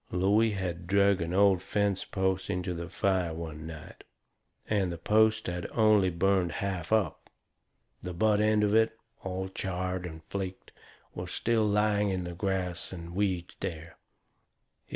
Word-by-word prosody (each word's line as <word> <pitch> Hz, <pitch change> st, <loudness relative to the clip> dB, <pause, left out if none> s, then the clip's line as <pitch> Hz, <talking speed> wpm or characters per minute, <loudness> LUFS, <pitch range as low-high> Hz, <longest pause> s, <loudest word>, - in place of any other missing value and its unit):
Looey 100 Hz, +5 st, +3 dB
had 90 Hz, -2 st, -4 dB
drug 100 Hz, 0 st, +3 dB
an 85 Hz, 0 st, -2 dB
old 95 Hz, -1 st, +4 dB
fence 100 Hz, -1 st, 0 dB
post 95 Hz, -1 st, -1 dB
onto 90 Hz, 0 st, -2 dB
the 85 Hz, +1 st, -6 dB
fire 90 Hz, -3 st, 0 dB
one 80 Hz, -1 st, -6 dB
night, 80 Hz, -2 st, -10 dB, 0.6 s
and 100 Hz, -4 st, +1 dB
the 85 Hz, -, -5 dB
post 110 Hz, +5 st, +3 dB
had 90 Hz, 0 st, -3 dB
only 110 Hz, -4 st, +4 dB
burned 90 Hz, -1 st, +1 dB
half 95 Hz, -2 st, -3 dB
up. 105 Hz, -8 st, 0 dB, 0.7 s
The 90 Hz, -, -5 dB
butt 105 Hz, +4 st, +2 dB
end 105 Hz, 0 st, +3 dB
of 105 Hz, 0 st, +2 dB
it, 110 Hz, 0 st, +3 dB, 0.3 s
all 95 Hz, 0 st, -3 dB
charred 90 Hz, -1 st, -3 dB
and 80 Hz, -2 st, -10 dB
flaked, 95 Hz, +1 st, -6 dB, 0.4 s
was -, -, -6 dB
still 110 Hz, -2 st, +1 dB
laying 105 Hz, 0 st, +2 dB
in 95 Hz, -2 st, -1 dB
the 85 Hz, 0 st, -5 dB
grass 90 Hz, -1 st, -2 dB
and 85 Hz, -2 st, -8 dB
weeds 95 Hz, -3 st, -1 dB
there. 80 Hz, -1 st, -5 dB
95 Hz, 150 wpm, -29 LUFS, 85-100 Hz, 0.7 s, old